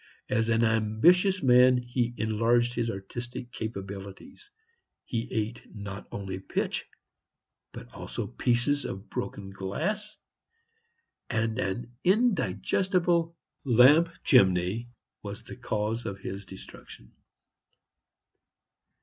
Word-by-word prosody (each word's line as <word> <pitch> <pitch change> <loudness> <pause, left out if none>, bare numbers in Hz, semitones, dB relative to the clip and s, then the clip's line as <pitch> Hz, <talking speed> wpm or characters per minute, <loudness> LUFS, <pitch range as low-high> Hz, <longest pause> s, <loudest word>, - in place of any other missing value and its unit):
As 115 +1 +1
an 115 +1 +3
ambitious 115 - +3
man 125 0 +6
he 120 -1 -2
enlarged 115 +3 +2
his 115 -1 -1
artistic 120 +5 -6
capabilities; 100 - -7 0.6
he 115 +1 -3
ate 115 0 -2
not 100 -1 -7
only 95 -2 -5
pitch 95 - -2 0.8
but - - -11
also - - -5
pieces 125 +4 +1
of 95 +2 -7
broken 95 -1 -5
glass, 170 - -3 1.1
and 115 +1 0
an 120 +3 -3
indigestible 180 -5 +2 0.3
lamp 140 +7 +6
chimney 100 - +3 0.3
was - - -7
the - - -9
cause 110 +2 -2
of 100 - -4
his 95 0 -7
destruction. 90 -9 -12
115 Hz, 100 wpm, -28 LUFS, 100-130 Hz, 1.1 s, man